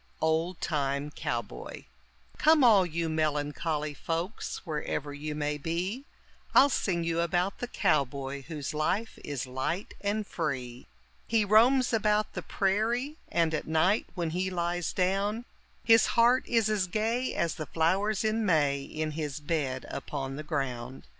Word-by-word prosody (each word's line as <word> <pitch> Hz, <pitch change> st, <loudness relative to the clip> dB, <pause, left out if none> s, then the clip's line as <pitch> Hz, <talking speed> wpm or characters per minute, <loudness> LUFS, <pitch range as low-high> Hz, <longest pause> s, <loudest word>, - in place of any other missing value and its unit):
OLD 160 Hz, +3 st, 0 dB
TIME 145 Hz, -2 st, -1 dB
COWBOY 120 Hz, -6 st, -5 dB, 0.5 s
Come 310 Hz, -2 st, +5 dB
all 205 Hz, -7 st, +6 dB
you 165 Hz, 0 st, -2 dB
melancholy 150 Hz, 0 st, -1 dB
folks 165 Hz, +10 st, -4 dB
wherever 150 Hz, -2 st, -3 dB
you 150 Hz, +1 st, -5 dB
may 150 Hz, 0 st, -2 dB
be, 180 Hz, -, -3 dB, 0.5 s
I'll 280 Hz, -, +8 dB
sing 175 Hz, -7 st, 0 dB
you 165 Hz, 0 st, 0 dB
about 175 Hz, +3 st, 0 dB
the 245 Hz, -, -3 dB
cowboy 140 Hz, -, 0 dB
whose 150 Hz, -4 st, -4 dB
life 185 Hz, +9 st, -1 dB
is 140 Hz, -3 st, -3 dB
light 130 Hz, +9 st, -3 dB
and 205 Hz, +1 st, 0 dB
free. 130 Hz, -9 st, -4 dB, 0.4 s
He 220 Hz, -2 st, +2 dB
roams 240 Hz, +5 st, +5 dB
about 215 Hz, -1 st, +2 dB
the -, -, -4 dB
prairie, 230 Hz, +9 st, 0 dB
and, 165 Hz, -2 st, +1 dB
at 155 Hz, -, -2 dB
night 160 Hz, +7 st, +2 dB
when 170 Hz, -3 st, -2 dB
he 185 Hz, +3 st, -1 dB
lies 175 Hz, -1 st, -1 dB
down, 200 Hz, +5 st, 0 dB, 0.4 s
His 225 Hz, -1 st, +6 dB
heart 240 Hz, +2 st, +5 dB
is 230 Hz, -3 st, +2 dB
as 210 Hz, -3 st, +1 dB
gay 225 Hz, +6 st, -1 dB
as 170 Hz, -1 st, 0 dB
the 155 Hz, -, -6 dB
flowers 190 Hz, +6 st, +1 dB
in 220 Hz, +1 st, +1 dB
May 145 Hz, -7 st, +2 dB
in 155 Hz, +2 st, -4 dB
his 150 Hz, -2 st, -4 dB
bed 145 Hz, -4 st, -2 dB
upon 135 Hz, -2 st, -5 dB
the 150 Hz, -, -5 dB
ground. 135 Hz, -5 st, -4 dB
170 Hz, 145 wpm, -29 LUFS, 150-210 Hz, 0.5 s, I'll